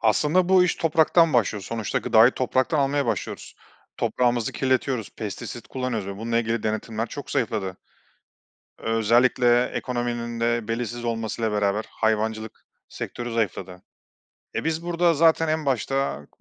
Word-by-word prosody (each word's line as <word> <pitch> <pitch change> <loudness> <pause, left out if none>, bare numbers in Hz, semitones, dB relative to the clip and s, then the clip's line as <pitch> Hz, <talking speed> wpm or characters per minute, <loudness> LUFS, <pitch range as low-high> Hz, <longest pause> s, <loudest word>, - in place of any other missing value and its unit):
Aslında 150 - +2
bu 185 -1 +6
iş 180 - 0
topraktan 165 0 +3
başlıyor. 105 -4 +1
Sonuçta 115 +1 -2
gıdayı 115 +3 +5
topraktan 130 +4 0
almaya 140 -1 +1
başlıyoruz. 110 -3 -4 0.4
Toprağımızı 120 -2 0
kirletiyoruz. 130 -3 0
Pestisit 110 +2 -6
kullanıyoruz 120 -6 -3
ve 100 - -6
bununla 115 +2 -1
ilgili 115 -1 -1
denetimler 110 +1 -2
çok 140 +4 -8
zayıfladı. 110 -8 -1 1.0
Özellikle 120 +2 +3
ekonominin 120 -2 -3
de 115 -1 0
belirsiz 120 +1 -3
olmasıyla 115 -1 -2
beraber 105 +1 0
hayvancılık 110 0 -1 0.4
sektörü 120 -1 -6
zayıfladı. 95 -4 -3 0.7
E, - - -2
biz 160 +1 -1
burada 175 0 +2
zaten 165 +1 +4
en 155 -1 -1
başta 135 - -1
120 Hz, 130 wpm, -24 LUFS, 110-135 Hz, 1.0 s, bu